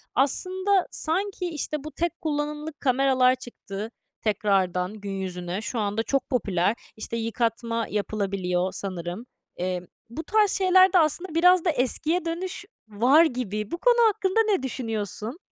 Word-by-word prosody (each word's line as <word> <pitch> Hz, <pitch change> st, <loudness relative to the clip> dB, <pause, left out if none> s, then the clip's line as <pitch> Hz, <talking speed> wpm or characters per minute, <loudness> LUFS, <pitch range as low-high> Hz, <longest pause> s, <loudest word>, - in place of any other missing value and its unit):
aslında 370 Hz, +8 st, +2 dB
sanki, 370 Hz, +3 st, -2 dB
işte, 305 Hz, -2 st, -3 dB
bu 310 Hz, -, -7 dB
tek 335 Hz, +3 st, -3 dB
kullanımlık 300 Hz, 0 st, -3 dB
kameralar 255 Hz, -1 st, +3 dB
çıktı 225 Hz, -4 st, -8 dB, 0.3 s
tekrardan 190 Hz, -3 st, +1 dB
gün 205 Hz, -2 st, -7 dB
yüzüne. 185 Hz, 0 st, -4 dB
Şu 230 Hz, +1 st, -3 dB
anda 210 Hz, +1 st, -1 dB
çok 275 Hz, +2 st, -1 dB
popüler. 200 Hz, -4 st, +1 dB, 0.2 s
İşte, 230 Hz, +1 st, -4 dB
yıkatma 230 Hz, 0 st, -1 dB
yapılabiliyor 195 Hz, -3 st, -1 dB
sanırım. 185 Hz, +3 st, -5 dB, 0.3 s
Eee, 180 Hz, 0 st, -3 dB, 0.2 s
bu 315 Hz, +8 st, -6 dB
tarz 420 Hz, -1 st, +3 dB
şeylerde 375 Hz, -1 st, +5 dB
aslında 320 Hz, +2 st, +1 dB
biraz 360 Hz, +1 st, +5 dB
da -, -, +3 dB
eskiye 310 Hz, +5 st, 0 dB
dönüş 355 Hz, +4 st, -4 dB, 0.2 s
var 250 Hz, +10 st, +5 dB
gibi. 215 Hz, -, -3 dB
Bu 340 Hz, -, -2 dB
konu 475 Hz, +3 st, +5 dB
hakkında 395 Hz, -1 st, +1 dB
ne 380 Hz, -10 st, +1 dB
düşünüyorsun? 225 Hz, -, -4 dB
250 Hz, 135 wpm, -25 LUFS, 205-330 Hz, 0.3 s, şeylerde